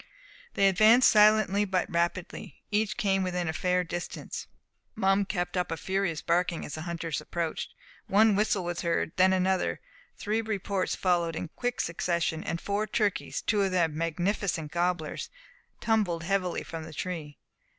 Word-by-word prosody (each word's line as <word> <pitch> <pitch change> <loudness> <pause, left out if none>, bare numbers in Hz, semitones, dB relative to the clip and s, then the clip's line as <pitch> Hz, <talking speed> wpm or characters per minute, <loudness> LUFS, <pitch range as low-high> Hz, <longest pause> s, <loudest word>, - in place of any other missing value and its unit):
They 195 - +4
advanced 215 +6 +6
silently 210 -1 +5
but 185 -3 0
rapidly. 170 +1 -3
Each 210 0 0
came 195 -4 +1
within 180 -2 -1
a 160 - -1
fair 180 +2 +1
distance. 175 0 -6 0.5
Mum 195 -1 +2
kept 180 -2 -3
up 180 -1 0
a 165 - -2
furious 190 -4 -1
barking 170 0 0
as 150 - -8
the 155 - -5
hunters 165 -2 -3
approached. 165 +1 -4 0.3
One 210 +1 +5
whistle 205 -2 +1
was 175 0 -3
heard, 170 -1 0
then 185 0 +5
another; 190 0 +1 0.4
three 215 +2 -1
reports 200 -3 -2
followed 170 -3 +1
in 160 - -4
quick 245 +7 -3
succession; 170 -1 -1
and 170 - -3
four 205 +3 -1
turkeys, 210 -3 -1
two 210 -1 +1
of 195 - +2
them 170 -4 +1
magnificent 165 0 -1
gobblers, 175 -3 -1 0.5
tumbled 205 -7 +1
heavily 185 -1 -1
from 165 -1 -7
the 160 0 -10
tree. 160 -4 -5
180 Hz, 155 wpm, -28 LUFS, 170-200 Hz, 0.5 s, advanced